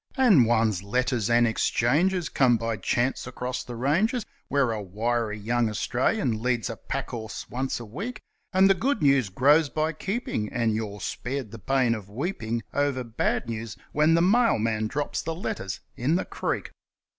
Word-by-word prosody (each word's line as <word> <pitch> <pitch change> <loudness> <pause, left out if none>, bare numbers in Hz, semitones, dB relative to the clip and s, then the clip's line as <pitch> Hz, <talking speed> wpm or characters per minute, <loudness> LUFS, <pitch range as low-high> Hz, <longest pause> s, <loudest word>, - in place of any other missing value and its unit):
And 200 - +6
one's 110 -5 +2
letters 120 +2 0
and 120 0 +5
exchanges 150 +10 +1
come 125 -3 +3
by 115 0 -2
chance 120 +5 0
across 125 0 -4
the 120 - -7
ranges, 190 - +1 0.2
Where 135 -3 +2
a 110 -2 -3
wiry 110 +3 -1
young 115 +2 0
Australian 120 - 0
leads 120 -4 0
a - - -5
pack - - -5
horse 110 -2 -6
once 130 +1 -2
a 120 - -7
week, 200 - -6 0.3
And 190 +1 +5
the 195 - +6
good 230 - -1
news 135 -6 +4
grows 145 - +4
by 155 +2 -1
keeping, 190 - -3
and 115 -2 +1
you're 105 -2 -4
spared 130 -3 -4
the 115 - -9
pain 130 +2 +2
of 105 -4 -6
weeping 115 - -3
Over 140 -3 0
bad 115 0 -1
news 115 -2 -5
when 155 +2 +4
the 170 - +4
mailman 115 - +2
drops 145 +5 -2
the 165 0 -4
letters 95 - -4
in 135 +7 +1
the 185 - 0
creek. - - -3
125 Hz, 170 wpm, -26 LUFS, 110-150 Hz, 0.3 s, And